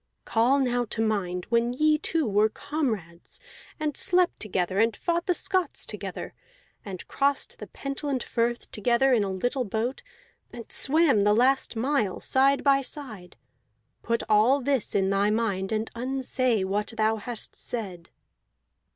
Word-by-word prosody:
Call 235 +5 +3
now 245 -3 +1
to 225 - -7
mind 195 -5 -1
when 235 +1 +2
ye 305 +3 +3
two 320 -1 0
were 210 +1 +3
comrades, 215 - -4 0.4
and 300 -2 -2
slept 360 0 +2
together, 190 -2 -1
and 225 -1 +2
fought 340 0 -1
the 360 - +2
Scots 370 0 0
together, - - -6 0.5
and 190 -3 -8
crossed 280 0 -1
the - - -8
Pentland 275 -1 -4
Firth 235 0 -2
together 240 +5 +2
in 225 -4 +3
a 195 - -2
little 245 +8 -1
boat, 225 +4 -3 0.5
and 235 -2 -10
swam 280 -7 +3
the 210 0 +4
last 260 +2 +2
mile 230 -5 0
side 275 +1 +2
by 275 -1 +4
side. 220 - -7 0.7
Put 230 0 -1
all 220 +6 +4
this 270 -3 -1
in 195 -1 +2
thy 200 +1 +2
mind, 210 -3 -1
and 220 0 -2
unsay 255 -3 0
what 205 +3 -2
thou 220 0 +2
hast 230 +1 -4
said." 190 -8 -4
235 Hz, 150 wpm, -26 LUFS, 210-275 Hz, 0.7 s, the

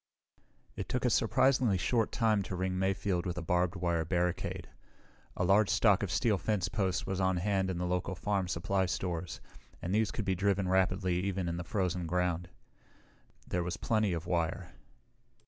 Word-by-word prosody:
_ - - -34 0.3
It - - -5
took - - -1
a - - +3
surprisingly 130 -6 +3
short 115 +5 +1
time 110 -3 +2
to 95 - -5
ring 95 0 -1
Mayfield 95 -2 0
with 90 0 -3
a 90 - -3
barbed 90 +2 +1
wire 85 -2 0
barricade. 90 +1 -1 0.7
A - - 0
large 100 +3 +4
stock 105 -4 +4
of 100 - -2
steel 105 - +1
fence 105 -5 0
posts 95 0 -1
was 95 -1 -2
on 95 -1 +2
hand 95 +1 0
in 90 - -2
the 90 - -2
local 90 +1 -1
farm 100 0 -1
supply 90 +2 0
stores, 90 -3 -3 0.4
and 90 - -3
these 110 +1 +2
could 110 - -4
be 95 - +1
driven 100 0 +1
rapidly 95 -1 +1
even 95 -1 -2
in 85 0 -2
the 90 - -4
frozen 90 -1 -1
ground. 90 0 -1 1.0
There 90 - -1
was 85 0 -3
plenty 110 -1 +1
of 85 -1 -3
wire. 85 -2 -2
95 Hz, 180 wpm, -31 LUFS, 90-100 Hz, 1.0 s, large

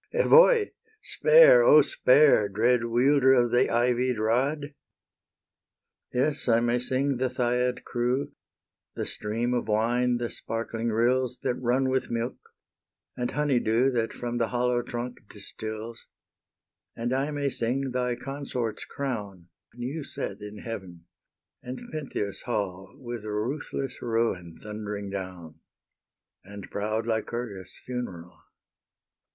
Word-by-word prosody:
Evoe! 485 -2 +6 0.4
spare, - - +7
O - - +7
spare, 150 - +4
Dread 120 +4 +2
wielder 130 +3 +4
of 120 -2 +3
the 125 +2 +3
ivied 125 +1 +1
rod! 135 +7 0 1.4
Yes, 140 +3 0
I 115 -1 +5
may 120 +1 +1
sing 130 +2 0
the 130 +1 0
Thyiad 125 0 0
crew, 125 +3 -1 0.6
The - - -3
stream 115 +4 -2
of 120 - -1
wine, 120 +3 +2
the 120 -1 -3
sparkling 115 0 -3
rills 125 +3 +1
That - - +1
run 130 +2 +1
with 130 - 0
milk, 120 +2 -2 0.8
and 120 0 -2
honey 145 -4 +1
dew 120 +4 +2
That 115 -2 -1
from 120 0 -4
the 115 - +1
hollow 125 +1 +1
trunk 120 +1 -5
distils; 110 +2 -6 0.9
And 120 +2 -2
I 135 +3 0
may 145 -2 -1
sing 130 +3 -1
thy 125 -1 -1
consort's 130 -4 -4
crown, 105 -10 -5 0.3
New 130 +6 -4
set - - -5
in 105 0 -8
heaven, 95 -8 -7 0.6
and 125 0 -6
Pentheus' 135 -10 -4
hall 95 -4 -3
With 120 -4 -7
ruthless 125 +5 -4
ruin 115 -8 -1
thundering 105 -1 -5
down, 90 -5 -7 0.8
And 100 0 -10
proud 110 +2 -2
Lycurgus' 110 -4 -4
funeral. 95 -9 -6
120 Hz, 125 wpm, -27 LUFS, 110-130 Hz, 1.4 s, spare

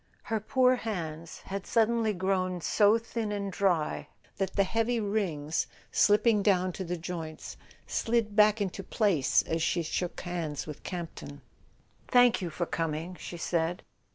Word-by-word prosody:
Her 225 -1 -1
poor 255 +3 +3
hands 170 -8 -5
had 195 0 -6
suddenly 230 -1 +2
grown 185 -1 0
so 210 +5 +4
thin 230 -1 -4
and 200 -1 -3
dry 180 -6 0 0.3
that 190 -1 -2
the 200 - +4
heavy 225 +4 0
rings, 180 -8 -1 0.2
slipping 210 +1 +4
down 185 -2 +2
to 190 - -4
the 180 0 -3
joints, 165 -2 -6 0.3
slid 225 -3 0
back 210 0 +5
into 195 -1 -2
place 185 - +2
as 165 0 -2
she 170 +1 +1
shook 175 +2 -3
hands 170 -5 -3
with 150 -2 -8
Campton. 165 -5 -7 0.7
"Thank 245 -3 +5
you 175 - -2
for 175 +2 -2
coming," 165 +2 -3
she 175 - -7
said. 170 +1 -1
190 Hz, 150 wpm, -29 LUFS, 170-215 Hz, 0.7 s, back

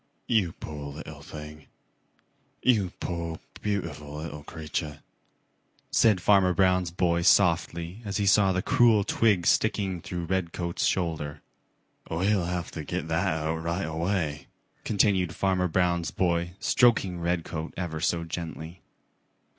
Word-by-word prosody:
"You 100 -8 +1
poor 75 -2 -7
little - - -9
thing. 75 0 -10 1.0
You 105 -8 +3
poor, 85 -2 -4 0.2
beautiful 85 -8 -3
little 75 -1 -6
creature," 75 -1 -5 0.9
said 110 -5 +4
Farmer 95 -1 +4
Brown's 90 -2 +3
boy 85 0 +1
softly 85 +1 +2
as 100 -2 -3
he 100 - 0
saw 100 -1 +5
the 95 0 -1
cruel 115 -4 +4
twig 100 -5 +2
sticking 95 -5 +1
through 85 0 -4
Redcoats' 85 -1 -2
shoulder. 80 -5 -2 0.7
"We'll 95 +2 +1
have 90 0 -3
to 80 - -6
get 80 - -4
that 80 +4 +1
out 80 -2 -1
right 85 +3 -2
away," 80 -2 -2 0.4
continued 95 -4 +2
Farmer 95 -1 +1
Brown's 85 0 +1
boy, 85 -1 0
stroking 105 -8 +3
Redcoat 85 -2 -3
ever 85 -3 -3
so 85 +1 0
gently. 85 +1 -6
85 Hz, 125 wpm, -27 LUFS, 80-95 Hz, 1.0 s, saw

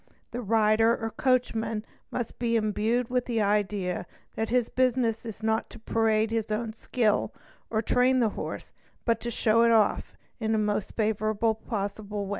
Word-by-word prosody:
The 245 - -4
rider 225 +1 +3
or 225 0 -4
coachman 225 -4 0 0.2
must 240 -2 -4
be 235 -1 +1
imbued 225 +3 0
with 250 -1 +1
the 235 -2 -1
idea 200 -4 0 0.3
that 225 0 -2
his 245 -1 +2
business 245 -3 +1
is 220 0 -8
not 220 0 0
to - - -11
parade 220 -1 +1
his 225 -1 -1
own 220 +1 -2
skill, 220 -1 0 0.4
or 220 0 0
train 255 +3 +3
the 230 -3 +3
horse, - - -6 0.3
but 230 -2 +3
only - - -29
to 240 - -3
show 230 0 +2
it 235 - +5
off 220 -3 +2 0.2
in 220 -1 0
the - - +2
most 210 -1 -1
favourable 215 0 +1
way 220 - -21
possible. 205 -1 -3
225 Hz, 175 wpm, -27 LUFS, 215-235 Hz, 0.4 s, it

